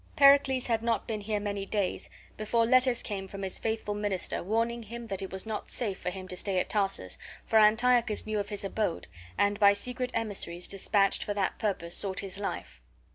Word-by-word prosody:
Pericles 275 -2 +6
had 225 -2 +1
not 230 -1 0
been 215 -2 -3
here 210 0 -1
many 200 -1 -3
days 195 -1 -2 0.3
before 230 +2 +1
letters 255 0 +4
came 195 -2 -4
from 195 +1 -7
his 190 - -2
faithful 220 -2 -2
minister, 205 -3 -2
warning 230 +4 0
him 235 +2 -8
that 195 -3 -2
it 190 - -5
was 190 +2 -5
not 220 -1 -4
safe 205 -6 -2
for 180 - -2
him 185 0 -7
to 180 - -5
stay 190 +1 -1
at 180 - 0
Tarsus, 195 - -1 0.3
for 220 - +4
Antiochus 225 +1 +4
knew 215 -1 -1
of 205 0 -3
his 205 -1 -4
abode, 195 -3 -2 0.3
and 205 0 +2
by 200 -1 +7
secret 250 +4 -2
emissaries 195 -6 -2
despatched 195 0 +1
for 205 - -3
that 195 -2 -1
purpose 195 -5 -1
sought 195 -2 -2
his 195 -1 -4
life. 130 - -5
205 Hz, 200 wpm, -29 LUFS, 195-230 Hz, 0.3 s, by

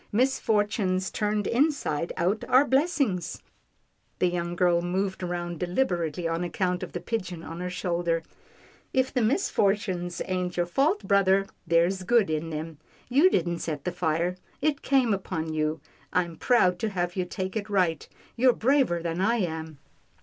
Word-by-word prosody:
" - - -35
Misfortunes 210 -6 +1
turned 210 -1 -1
inside 245 - 0
out 185 +5 0
are 260 +3 +6
blessings." 270 - 0 0.7
The 180 - +2
young 175 0 -3
girl 175 -1 +3
moved 190 +2 -2
round 175 -2 -3
deliberately 175 - -1
on 165 +1 -1
account 180 +1 -1
of 185 - -6
the 175 - -3
pigeon 180 -3 -4
on 165 +1 -7
her 180 0 -3
shoulder. 170 -2 -1 0.7
"If 260 0 +1
the 250 - +1
misfortunes 200 - 0
ain't 180 -1 -2
your 175 - +2
fault, 285 - +1
brother, 195 -1 +4 0.2
there's 170 +3 +2
good 205 -2 +3
in 155 +1 -2
them. 155 0 -6 0.3
You 285 +9 +5
didn't 170 - 0
set 150 -4 -4
the 180 - -2
fire. 175 +1 -1 0.2
It 290 -1 0
came 260 -5 +3
upon 165 -5 -3
you. 155 0 -1 0.3
I'm 175 -2 0
proud 185 -7 +3
to 220 - -1
have 175 -3 -2
you 185 -2 -1
take 185 +2 -4
it 215 -1 -3
right. 180 -5 +1 0.3
You're 250 +1 +4
braver 240 - +2
than 170 +1 -2
I 225 +5 +3
am." 160 -7 -3
180 Hz, 160 wpm, -27 LUFS, 170-215 Hz, 0.7 s, are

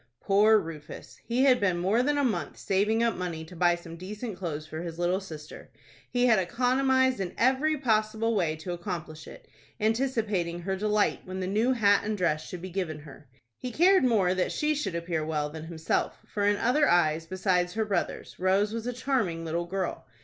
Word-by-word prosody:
Poor 210 +2 +5
Rufus! 165 -6 -7
He 245 +3 +1
had 260 -2 +5
been 185 -4 +1
more 195 +7 +2
than 290 +3 +1
a 285 - +2
month 245 -5 -1
saving 210 +4 +1
up 230 -1 +1
money 170 -3 -4
to 180 - -13
buy 175 0 +3
some 170 -1 -10
decent 210 +4 -6
clothes 155 -5 -5
for 155 +1 -6
his 170 -1 -6
little 175 +2 +1
sister. 155 -6 -10 0.4
He 245 0 +2
had 225 -5 +5
economized 255 +5 +2
in 185 -2 -4
every 270 +6 +2
possible 220 -3 +1
way 165 -7 +1
to 160 +3 -6
accomplish 170 -4 -6
it, - - -12 0.3
anticipating 215 -7 0
her 190 +2 -2
delight 210 +1 +1
when 185 0 -5
the 185 - -2
new 220 +7 +2
hat 205 -4 +4
and 215 0 -2
dress 155 -4 0
should 180 -1 -8
be 185 - -6
given 165 -5 -3
her. 145 -1 -14 0.3
He 250 - -4
cared 360 +7 +4
more 205 -8 +3
that 185 -1 0
she 300 0 0
should 280 - -3
appear 170 -2 -2
well 150 -1 -2
than 160 0 -7
himself, 160 -1 -2
for 205 -1 -1
in 205 0 +3
other 285 +7 +3
eyes, 165 -2 +2
besides 180 -1 0
her 220 -1 0
brother's, 195 -5 -3
Rose 195 +3 +2
was 230 +1 -4
a 245 - -2
charming 225 -10 -1
little 170 +2 -2
girl. 185 +1 -4
195 Hz, 200 wpm, -28 LUFS, 170-230 Hz, 0.4 s, Poor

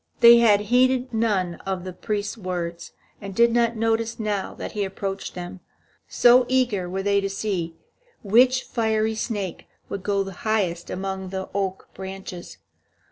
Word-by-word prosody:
They 235 0 +9
had 210 -3 +5
heeded 250 +3 +2
none 200 -6 0
of 190 -2 -3
the 185 0 -6
priest's 205 +2 -3
words, 175 -5 -5 0.3
and 195 -1 -7
did 235 +2 +5
not 235 0 +2
notice 225 +1 0
now 210 -3 -2
that - - -6
he 210 - -2
approached 195 0 -4
them, 180 +1 -7 0.5
so 245 +1 +5
eager 240 -9 +1
were 190 +1 -3
they 200 0 +2
to 195 - -2
see 190 -5 -3 0.5
which 250 +5 +4
fiery 220 -2 0
snake 205 -4 -4 0.2
would 200 - -4
go 200 0 0
highest 185 -4 -1
among 190 0 -4
the 190 0 -5
oak 195 -1 -3
branches. 190 -2 -8
200 Hz, 150 wpm, -24 LUFS, 190-225 Hz, 0.5 s, They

